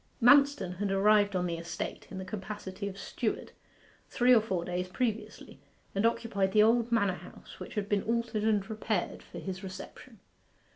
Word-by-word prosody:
Manston 275 -7 +5
had 205 +1 -1
arrived 205 +1 +4
on 180 -1 +1
the 170 -1 -2
estate, 170 +1 -5
in 190 - -7
the 190 - -5
capacity 200 0 -6
of 195 -1 -7
steward, 195 - -3 0.6
three 250 0 +4
or 230 - +6
four 190 -6 -2
days 180 +1 -2
previously, 225 +3 -3 0.3
and 200 +3 +3
occupied 200 -5 -1
the 210 - +6
old 230 +1 +3
manor 200 -5 +3
house, - - -13
which - - -8
had 205 -2 -1
been 205 -1 +1
altered 230 -1 -1
and 210 -2 +2
repaired 215 -3 -2
for - - -12
his 190 0 -5
reception. 195 +4 -9
205 Hz, 175 wpm, -30 LUFS, 190-225 Hz, 0.6 s, or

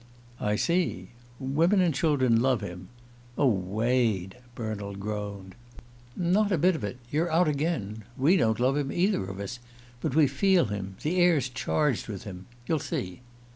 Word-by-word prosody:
"I 105 0 0
see. 170 - 0 0.3
'Women 160 +9 +2
and 175 -4 +3
children 130 -6 +2
love 130 -3 +2
him.' 90 +1 -7 0.5
Oh, 145 - +3
Wade!" 110 -1 +1 0.2
Bernald 105 -3 -5
groaned. 100 -2 -5 0.6
"Not 190 +4 +2
a 185 - +3
bit 180 +3 +3
of 130 - -6
it! 105 +4 -4
You're 160 +3 0
out 170 +2 +4
again. 140 - -2
We 150 +8 +4
don't 110 - +2
love 130 +3 +2
him, 140 -2 -1
either 190 - +1
of 95 +1 -7
us. 100 +5 -5 0.4
But 140 +1 -2
we 155 -2 +6
feel 175 +7 +3
him 95 -2 -5
the 165 +5 0
air's 165 -8 +3
charged 130 +1 0
with 100 -4 -6
him. 95 -3 -9 0.2
You'll 160 +4 0
see." 90 -5 -4
130 Hz, 165 wpm, -27 LUFS, 105-160 Hz, 0.6 s, we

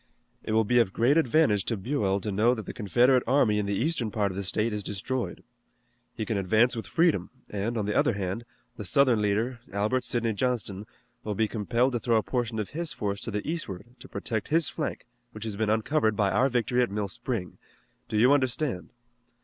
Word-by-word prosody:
It 110 - -3
will 110 0 +4
be 120 +3 +3
of 100 -5 +2
great 120 +5 +3
advantage 155 -9 +3
to 115 - -1
Buell 100 -3 0
to 105 - -3
know 110 +5 +3
that 110 - -6
the - - -6
Confederate 125 +4 +3
army 115 -5 +3
in 100 - -1
the 100 - 0
eastern 125 -1 0
part 105 -2 0
of - - -8
the 100 - -2
state 105 +4 -1
is 105 - -2
destroyed. 115 +6 -3 0.7
He 110 - -3
can 110 -2 -1
advance 110 +6 +3
with 115 - -5
freedom 170 -1 +2 0.2
and, 105 +4 -2
on 105 - -1
the 105 - -1
other - - +3
hand, 100 +2 -3 0.3
the 105 - -5
Southern 120 +3 +3
leader, 110 +4 0
Albert 105 +6 0
Sidney 115 -2 0
Johnston, 105 -4 -2 0.4
will 105 -1 -3
be 110 +2 +2
compelled 115 +4 0
to 120 - -1
throw 115 0 +2
a 110 - +1
portion 120 -3 -2
of 105 -2 -3
his 165 0 -3
force 100 -1 -3
to - - -5
the 105 -1 -3
eastward 120 - -5
to - - -13
protect 110 -3 -3
his 165 +1 +2
flank 155 - -4 0.3
which 110 - -7
has 110 -2 -4
been 110 +1 0
uncovered 110 +1 +1
by 100 -1 +2
our 135 +2 +3
victory 125 0 +1
at 120 - +1
Mill 100 0 -2
Spring. 100 -2 -4 0.5
Do 110 - -1
you 125 +6 +6
understand?" 130 - 0
110 Hz, 215 wpm, -27 LUFS, 105-125 Hz, 0.7 s, you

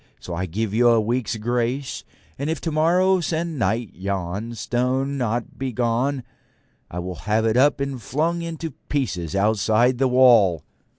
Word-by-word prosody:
So 90 - -7
I 90 +2 -2
give 105 +4 -3
you 120 +2 +4
a 115 -1 +5
week's 115 +2 -1
grace, 120 +4 -2 0.4
and 140 +2 -2
if 160 - -1
tomorrow 175 +4 +2
sennight 145 - -1
yon 100 +4 -4
stone 125 +5 -1
be 140 - -3 0.5
not 125 - -5
gone, 125 +3 0 0.7
I 90 - -8
will 90 +1 -4 0.2
have 110 +1 +2
it 110 0 +2
up 140 +4 +4
and 140 -3 -3
flung 165 +9 -1
in 165 -1 -5 0.3
pieces 90 - -2
outside 110 +4 +2
the 135 - +3
wall.' 120 - +5
120 Hz, 155 wpm, -23 LUFS, 105-140 Hz, 0.7 s, a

